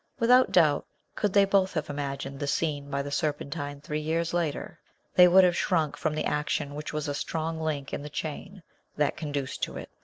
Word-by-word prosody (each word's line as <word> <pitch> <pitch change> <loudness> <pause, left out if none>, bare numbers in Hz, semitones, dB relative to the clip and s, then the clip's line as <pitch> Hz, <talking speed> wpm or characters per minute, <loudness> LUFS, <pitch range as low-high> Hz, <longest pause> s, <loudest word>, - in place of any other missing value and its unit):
Without 250 +2 +5
doubt, 155 -5 +4 0.3
could 210 - 0
they 200 +1 +5
both 195 -2 +2
have 155 - -1
imagined 140 -1 -4
the 145 - -2
scene 145 -1 -1
by 140 0 -1
the 145 - -6
Serpentine 145 -1 -3
three 150 0 -3
years 165 +2 -1
later, 170 -4 -2 0.3
they 180 0 +8
would 185 +2 +7
have 180 -1 +4
shrunk 160 -6 +1
from 155 0 -2
the 155 - -1
action 150 -1 -1
which 150 +1 -5
was 150 0 -3
a 145 - -1
strong 160 +2 -3
link 145 -3 -3
in - - -2
the 150 - -7
chain 165 +6 -6 0.3
that 145 -1 +1
conduced 145 -4 -4
to - - -2
it. - - -8
150 Hz, 205 wpm, -28 LUFS, 145-170 Hz, 0.3 s, they